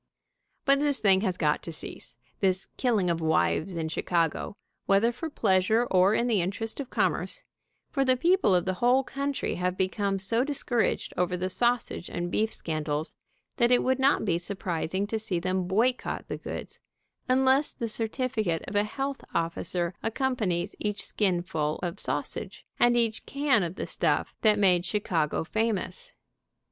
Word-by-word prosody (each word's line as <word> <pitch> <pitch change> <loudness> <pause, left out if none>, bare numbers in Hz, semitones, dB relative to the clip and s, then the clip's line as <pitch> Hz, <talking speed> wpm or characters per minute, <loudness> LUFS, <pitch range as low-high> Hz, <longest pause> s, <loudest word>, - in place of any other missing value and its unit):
But 275 0 +5
this 290 -1 +2
thing 190 -2 +4
has 185 -4 0
got 150 -2 +1
to 165 - -7
cease, 155 - -8 0.2
this 190 -1 +1
killing 225 -8 +1
of 165 -1 -2
wives 160 - +1
in 165 -1 -2
Chicago, 165 +3 -1 0.3
whether 200 +4 +4
for 320 +7 -5
pleasure 220 -1 +2
or 190 +3 +5
in 235 - +1
the 225 -6 +2
interest 205 +7 -3
of 270 -3 -5
commerce, - - -1 0.5
for 275 - +1
the 255 -1 +3
people 335 - +3
of 175 - +1
the 185 - 0
whole 250 +2 +4
country 275 +1 -2
have 180 0 0
become 195 +1 0
so 210 +6 +1
discouraged 265 -4 -1
over 180 0 +1
the 185 +1 -2
sausage 240 -2 0
and 175 0 -3
beef 220 +1 +1
scandals 155 -1 -3 0.4
that 240 -2 +4
it 245 - +4
would 260 +1 +1
not 270 -3 +3
be 170 -4 +1
surprising 185 0 -2
to 220 +2 -2
see 205 -5 -2
them 185 0 -1
boycott 235 +7 0
the - - -4
goods, - - -7 0.5
unless 265 +3 +3
the 235 - -4
certificate 220 - -1
of 200 - -6
a 205 - +4
health 270 +6 -4
officer 170 +1 -1
accompanies 225 -7 -1
each 210 -1 -2
skinful 175 -6 0
of 175 -1 -3
sausage, - - -4
and 240 0 +4
each 230 -2 0
can 280 -5 +2
of 175 0 -3
the - - -4
stuff - - 0
that 215 -2 +4
made 185 -4 +4
Chi 200 +4 -1
cago 160 -5 -1
famous. 225 - -2
205 Hz, 165 wpm, -28 LUFS, 180-245 Hz, 0.5 s, But